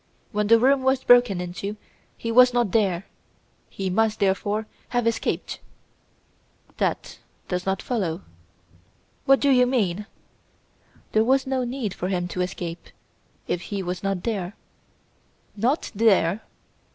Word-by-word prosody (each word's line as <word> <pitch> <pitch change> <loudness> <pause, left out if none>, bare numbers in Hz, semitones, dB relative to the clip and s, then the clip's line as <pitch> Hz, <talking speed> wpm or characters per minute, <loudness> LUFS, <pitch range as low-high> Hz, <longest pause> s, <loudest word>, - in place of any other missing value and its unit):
When 210 -2 0
the 230 +1 +7
room 265 +3 +3
was 265 0 +1
broken 245 -6 +5
into 180 +4 -5 0.4
he 230 - -3
was 250 +1 +6
not 240 -5 +2
there! 195 -4 +1 0.6
He 190 -1 -3
must, 220 +2 +1
therefore, 205 +2 0 0.2
have 245 -1 0
escaped." 230 0 -1 1.2
"That - - -2 0.3
does 180 0 -2
not 190 0 -1
follow." 195 -8 -2 1.0
"What 270 -1 +5
do 280 - +3
you 250 -1 +5
mean?" 210 -5 0 1.0
"There 220 - +3
was 265 +3 +2
no 265 -1 -1
need 240 -5 -3
for 180 - -4
him 180 -2 -1
to 180 - -3
escape 175 -2 -5 0.6
if 175 - -1
he 200 -2 -3
was 180 0 -4
not 195 -2 -2
there!" 205 -4 -3 1.0
"Not 245 +9 0
there!" 200 -3 +3
210 Hz, 135 wpm, -24 LUFS, 185-245 Hz, 1.2 s, the